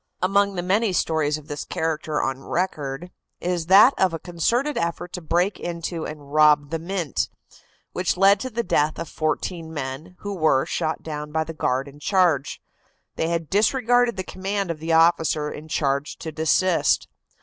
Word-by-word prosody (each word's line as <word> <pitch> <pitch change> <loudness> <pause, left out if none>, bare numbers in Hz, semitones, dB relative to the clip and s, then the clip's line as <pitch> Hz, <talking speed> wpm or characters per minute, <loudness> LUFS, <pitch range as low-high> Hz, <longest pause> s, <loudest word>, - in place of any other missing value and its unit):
Among 200 +1 +2
the 175 - -2
many 200 +3 +1
stories 155 -3 +1
of 150 -1 -13
this 145 0 -5
character 155 -1 -2
on 135 0 -3
record 165 -2 -3 0.3
is 175 -2 -2
that 205 +8 +8
of 185 -3 +2
a - - -5
concerted 235 - 0
effort 170 +1 -3
to 180 - -5
break 175 +5 0
into 170 -1 -4
and 145 -2 -10
rob 150 -2 +5
the 165 - -1
Mint, 170 -3 -2 0.6
which 180 0 -1
led 195 +1 +5
to 260 - -4
the 235 0 -2
death 155 -5 +1
of 165 - -5
fourteen 160 +1 -3
men, 150 +4 -6
who 205 0 -4
were 155 -7 +2
shot 160 -2 -2
down 150 -1 -6
by 160 +1 0
the 165 +1 -7
guard 135 -3 -1
in 140 +1 -13
charge. 170 -4 +1 0.6
They 160 - -1
had 165 -1 -2
disregarded 240 - +2
the 185 - -2
command 195 0 -3
of 160 - -6
the 165 +1 -3
officer 160 -2 +3
in 155 +1 -9
charge 140 -2 -1
to 160 - -6
desist. 160 +3 +2
165 Hz, 175 wpm, -23 LUFS, 150-185 Hz, 0.6 s, that